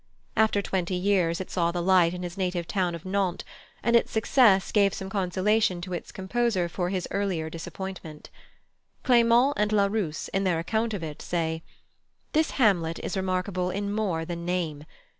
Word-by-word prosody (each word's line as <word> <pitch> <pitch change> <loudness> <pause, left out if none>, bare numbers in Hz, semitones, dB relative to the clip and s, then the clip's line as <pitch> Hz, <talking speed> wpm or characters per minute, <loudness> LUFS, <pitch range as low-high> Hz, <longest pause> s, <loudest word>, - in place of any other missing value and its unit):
After 215 -2 +3
twenty 185 -1 -1
years 180 -3 +1
it 190 - -6
saw 170 -1 +1
the 175 - -3
light 180 -1 +4
in 180 - -6
his 175 0 -5
native 180 -3 -2
town 180 -4 0
of 170 - -10
Nantes, 190 -2 -1 0.4
and 235 +2 +3
its 235 - +3
success 220 -3 +4
gave 200 -2 +3
some 190 0 -6
consolation 195 0 +1
to 185 +1 -6
its 175 - -5
composer 190 -1 0
for 175 +1 -2
his 185 -1 -2
earlier 180 -6 -1
disappointment. 165 -2 -8 0.7
Clément 240 +2 +5
and 210 0 +1
Larousse, 200 -5 0
in 195 - -1
their 180 -3 +1
account 220 +6 -1
of 180 - -5
it, 155 -1 -6
say: 160 -2 -2 0.7
"This 315 +1 +2
Hamlet 175 -9 +2
is - - -3
remarkable 185 -1 -1
in 200 +2 -2
more 185 -7 -1
than 170 0 -5
name. 170 -4 -2
185 Hz, 170 wpm, -26 LUFS, 175-205 Hz, 0.7 s, Clément